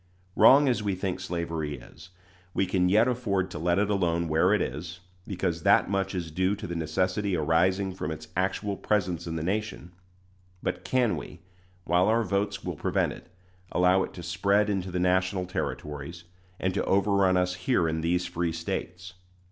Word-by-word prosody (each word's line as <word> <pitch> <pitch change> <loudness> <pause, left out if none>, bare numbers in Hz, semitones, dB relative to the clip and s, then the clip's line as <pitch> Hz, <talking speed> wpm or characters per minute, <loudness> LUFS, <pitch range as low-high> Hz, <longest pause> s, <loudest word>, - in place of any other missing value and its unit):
Wrong 140 +2 +7
as 120 -4 +1
we 100 -2 -1
think 95 -1 -3
slavery 85 -5 -3
is, 80 +3 -14 0.5
we 95 - +2
can 90 -1 +1
yet 110 +5 +4
afford 105 -7 -1
to - - -6
let 85 +2 +1
it 105 +1 +1
alone 85 -4 +1
where 80 +4 +3
it 105 - +3
is, 85 +5 -4 0.3
because 90 -4 -2
that - - +4
much 95 0 -1
is 85 -3 -4
due 95 +4 +1
to 100 - -8
the 85 - -5
necessity 90 +5 0
arising 90 +5 +1
from 90 -5 -4
its 80 0 -6
actual 95 +2 -1
presence 90 -5 -1
in 80 - -3
the 80 - -3
nation; 100 -1 -3 0.7
but 90 - -2
can 125 -4 +1
we, - - -9 0.4
while 90 +1 +2
our 115 +1 +3
votes 100 +1 -1
will - - -4
prevent - - 0
it, - - -14 0.4
allow 90 +1 +4
it - - -3
to 90 - -8
spread 100 +4 +1
into 95 -2 -2
the 90 - -3
national 95 +1 +1
Territories, 80 -1 -5 0.4
and 95 0 0
to 100 - 0
overrun 100 -1 +3
us 90 0 +1
here 90 0 +1
in 80 0 -1
these 90 +2 0
free 85 0 -2
States? 90 +2 -5
90 Hz, 180 wpm, -27 LUFS, 85-100 Hz, 0.7 s, Wrong